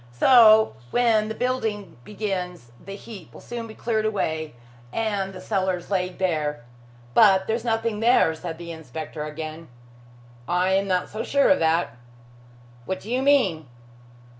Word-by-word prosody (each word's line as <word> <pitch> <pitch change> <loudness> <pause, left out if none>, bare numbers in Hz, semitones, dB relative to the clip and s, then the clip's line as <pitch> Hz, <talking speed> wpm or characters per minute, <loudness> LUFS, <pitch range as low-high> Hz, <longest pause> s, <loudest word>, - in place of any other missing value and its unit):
So 220 - +6
when 225 - +2
the 220 - -4
building 225 - -2
begins 180 - -5
the 195 +1 -8
heap 200 -3 -11
will - - -13
soon 235 -1 -7
be 220 - -11
cleared 220 -2 -1
away 160 - -2 0.4
and 205 -4 -2
the 185 - -10
cellars 185 0 -2
laid 180 -2 -1
bare. 150 -8 -1 0.5
But 190 - +5
there's 225 +1 -2
nothing 225 -2 -1
there," 225 -8 +4
said 165 0 -7
the 170 0 -8
inspector 160 -1 -7
again. 155 +1 -7 0.8
"I 180 +2 +1
am 195 +1 +1
not 180 -1 0
so 215 - -5
sure 280 0 +2
of 285 - +4
that." 160 -6 +1 0.9
"What 190 - -3
do 220 - -9
you 255 +1 +1
mean?" 225 - +2
195 Hz, 150 wpm, -24 LUFS, 165-220 Hz, 0.9 s, So